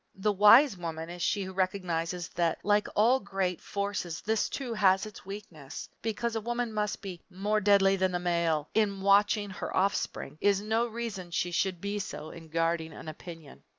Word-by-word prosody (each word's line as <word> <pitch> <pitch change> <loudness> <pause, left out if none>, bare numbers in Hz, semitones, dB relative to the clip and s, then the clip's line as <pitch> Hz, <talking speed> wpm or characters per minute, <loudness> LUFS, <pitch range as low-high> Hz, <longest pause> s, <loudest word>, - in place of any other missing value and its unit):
The 210 +2 +1
wise 210 +5 +7
woman 165 -1 -5
is 175 0 -8
she 200 +3 +1
who 190 0 -7
recognizes 180 -2 -1
that 170 -2 0
like 205 0 +2
all 240 +5 +4
great 195 -4 -2
forces 200 -4 -3
this, 220 0 0
too, 255 -4 -4
has 195 -2 +3
its 210 -3 -11
weakness. 175 -9 -8
Because 230 +1 -2
a 225 - -1
woman 240 0 -2
must 210 0 -2
be 185 -3 -7
"more 205 +3 0
deadly 200 -1 +5
than 190 0 +1
the - - +1
male" 170 -4 0
in 200 -3 +1
watching 205 +1 +3
her - - -4
offspring 190 -4 -1
is 200 -1 +3
no 220 +3 0
reason 225 -6 -5
she 175 +1 -1
should 185 0 0
be 200 +2 -3
so 160 -5 -6
in 165 -1 -12
guarding 165 0 0
an - - -10
opinion. 155 - -10
195 Hz, 185 wpm, -29 LUFS, 175-210 Hz, -, wise